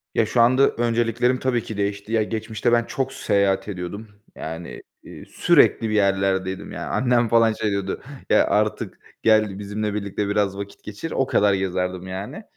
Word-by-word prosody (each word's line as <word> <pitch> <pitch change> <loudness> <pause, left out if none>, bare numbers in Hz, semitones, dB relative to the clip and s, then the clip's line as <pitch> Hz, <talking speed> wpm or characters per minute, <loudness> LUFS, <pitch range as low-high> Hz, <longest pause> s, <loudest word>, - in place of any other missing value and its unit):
Ya 110 - +3
şu 120 +2 +2
anda 130 +3 +5
önceliklerim 120 +2 +1
tabii 125 -3 0
ki 110 - -7
değişti. 100 +1 -3
Ya 110 -2 +2
geçmişte 110 +2 -2
ben 120 -1 +4
çok 135 -2 -3
seyahat 100 -3 +1
ediyordum. 100 +3 -6 0.3
Yani, 80 +2 -7 0.2
iii, - - -11
sürekli 115 - +3
bir - - -2
yerlerdeydim 95 -1 0
yani. - - -5
Annem 120 -2 +2
falan 115 -1 +4
şey 110 -1 -2
diyordu, 100 -1 -3 0.3
"Ya - - +5
artık 105 0 -1 0.2
gel 110 -3 +3
bizimle 105 +1 -3
birlikte 100 0 -3
biraz 100 -1 0
vakit 100 0 -8
geçir." 105 +10 -7
O 135 - +1
kadar 100 -4 +3
gezerdim 90 -1 -2
yani. 100 - -6
105 Hz, 165 wpm, -23 LUFS, 95-115 Hz, 0.3 s, anda